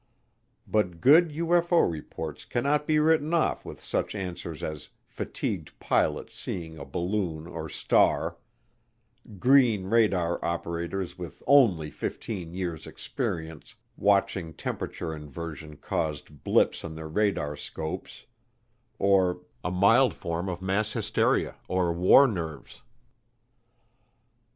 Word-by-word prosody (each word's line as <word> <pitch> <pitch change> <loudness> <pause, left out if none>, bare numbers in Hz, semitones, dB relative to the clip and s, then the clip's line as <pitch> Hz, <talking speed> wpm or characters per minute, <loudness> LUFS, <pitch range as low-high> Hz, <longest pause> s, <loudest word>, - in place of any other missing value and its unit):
But 90 -6 0
good 160 - +6
UFO 170 +2 +3
reports 80 -3 -6
cannot 145 +4 0
be 155 - +3
written 155 +1 +3
off 165 - +1
with - - -9
such - - -2
answers 90 -5 -5
as 75 -1 -5 0.2
fatigued - - -4
pilots - - 0
seeing 80 -3 -5
a 70 - -7
balloon 85 +1 -2
or 85 - -6
star; - - +2 1.0
"green" 125 -4 +4
radar 95 -5 +2
operators 85 +2 -3
with 90 -2 -8
only 100 - +4
fifteen 90 -1 -5
years' 85 -4 -4
experience 80 -2 -5 0.2
watching 100 -5 +1
temperature 80 -2 -4
inversion 75 0 -8
caused 75 -2 -4
blips - - +2
on 80 -2 -6
their 80 0 -6
radarscopes; 80 -4 -3 0.7
or 95 -2 +3 0.2
"a 90 - -1
mild 105 +8 +4
form 85 +2 -3
of 90 0 -5
mass 100 +3 0
hysteria - - +1
or 90 -2 +1
war 90 +11 +7
nerves." 85 - -5
90 Hz, 110 wpm, -27 LUFS, 80-110 Hz, 1.0 s, war